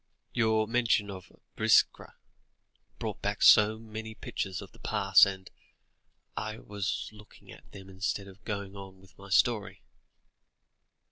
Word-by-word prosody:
"Your 110 -2 +2
mention 115 -3 +1
of 95 -2 -10 0.2
Biskra - - +2 0.8
brought - - -5
back - - -2
so 110 +1 +7
many 110 0 -8
pictures 95 -3 -4
of 100 - -10
the - - -20
past, 100 -3 +4
and 95 -1 -6 0.9
I 110 0 -4
was 105 -3 -4
looking 105 0 -16
at - - -16
them 95 -1 -12
instead 95 +1 -3
of 100 +2 -15
going 100 -2 -5
on 95 -1 -11
with 95 0 -21
my 100 0 -12
story." 105 +2 +1
100 Hz, 135 wpm, -29 LUFS, 95-110 Hz, 0.9 s, so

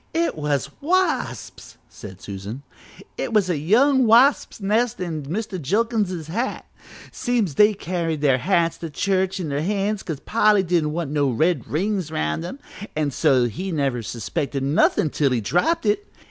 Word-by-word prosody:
"It 335 0 +1
was 150 -3 -1
wasps!" 370 +5 -1
said 95 -4 -11
Susan, 100 +7 -7 0.6
"it 235 - -3
was 200 -4 +3
a 165 - 0
young 250 - +3
wasps' 245 +5 +4
nest 215 +4 0
in 165 -4 -3
Mr. 190 +1 -4
Jilkins's 200 - 0
hat. 225 - -3 0.5
Seems 235 - -1
they 210 +7 +5
carried 170 -5 -3
their 135 -3 +3
hats 170 +1 +1
to 165 - -5
church 190 +3 0
in 170 -4 -3
their 140 +1 -1
hands 200 +3 -1
'cause 155 -5 -5
Polly 210 0 +3
didn't 165 -4 0
want 165 -3 -3
no 145 -2 +1
red 150 +1 0
rings 185 +1 -1
around 75 - -2
'em, 180 +10 -6 0.4
an' 150 -2 0
so 130 0 +3
he 180 - -4
never 135 -6 -1
suspected 135 - -3
nothin' 145 +2 +2
till 145 -2 +1
he 125 -2 0
dropped 180 - 0
it. 205 -1 0
175 Hz, 160 wpm, -22 LUFS, 145-210 Hz, 0.6 s, they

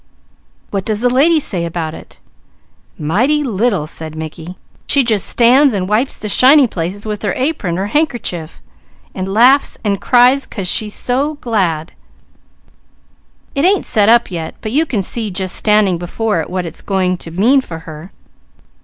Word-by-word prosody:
"What 195 -2 -2
does 215 +1 -2
the 245 0 +2
lady 310 +6 +4
say 185 - -4
about 165 -2 -4
it?" - - -13 0.8
"Mighty 250 - +1
little!" 220 - 0
said 155 0 -7
Mickey. 160 +3 -8 0.3
"She 280 - +3
just 220 -5 0
stands 250 +2 +4
and 185 -2 -2
wipes 220 +6 0
the 215 - -6
shiny 265 +7 +5
places 195 -1 -4
with 210 -2 -4
her 205 -4 -1
apron 255 - -2
or 190 - -1
handkerchief, 210 - -2 0.5
and 190 0 -4
laughs 250 +7 +4
and 200 -3 -1
cries, 255 +2 +4
'cause 195 -4 -5
she's 210 +3 0
so 275 +5 -1
glad. 185 - -2 1.6
It 275 - -1
ain't 385 +2 +2
set 210 -1 +2
up 235 -3 +4
yet, 165 -3 -5
but 215 - -5
you 310 +6 +1
can 210 -8 -1
see 220 +3 -3
just 185 -1 -3
standing 210 -5 +2
before 180 +1 -2
it - - -7
what 185 -1 -3
it's 165 - -8
going 185 -2 0
to 170 - -8
mean 225 +11 +3
for 170 -10 -8
her. 155 +3 -10
210 Hz, 165 wpm, -15 LUFS, 180-250 Hz, 1.6 s, shiny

